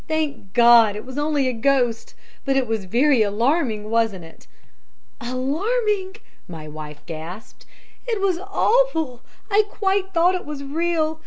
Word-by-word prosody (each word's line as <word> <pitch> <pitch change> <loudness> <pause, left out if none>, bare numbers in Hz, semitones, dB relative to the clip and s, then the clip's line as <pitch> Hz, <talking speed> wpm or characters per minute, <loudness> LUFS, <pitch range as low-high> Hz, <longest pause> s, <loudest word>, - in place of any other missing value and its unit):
'Thank 300 -11 -3
God! 235 -3 +6
It 210 - -7
was 260 +2 -6
only 295 -2 +1
a 255 - 0
ghost! 245 -1 0 0.3
but 270 -1 +1
it 265 - +2
was 220 -4 -3
very 250 +5 +3
alarming, 220 +1 0
wasn't 225 -6 0
it?' 160 - -17 0.7
"'Alarming!' 380 - -1 0.3
my 160 -3 -9
wife 150 -1 -9
gasped, 165 +6 -9 0.4
'it 455 -4 -1
was 380 -3 0
awful! 385 - +1 0.3
I 410 +2 +5
quite 385 -1 -1
thought 350 0 +3
it 365 - -3
was 295 -2 -7
real! 315 +1 -1
270 Hz, 145 wpm, -22 LUFS, 225-345 Hz, 0.7 s, God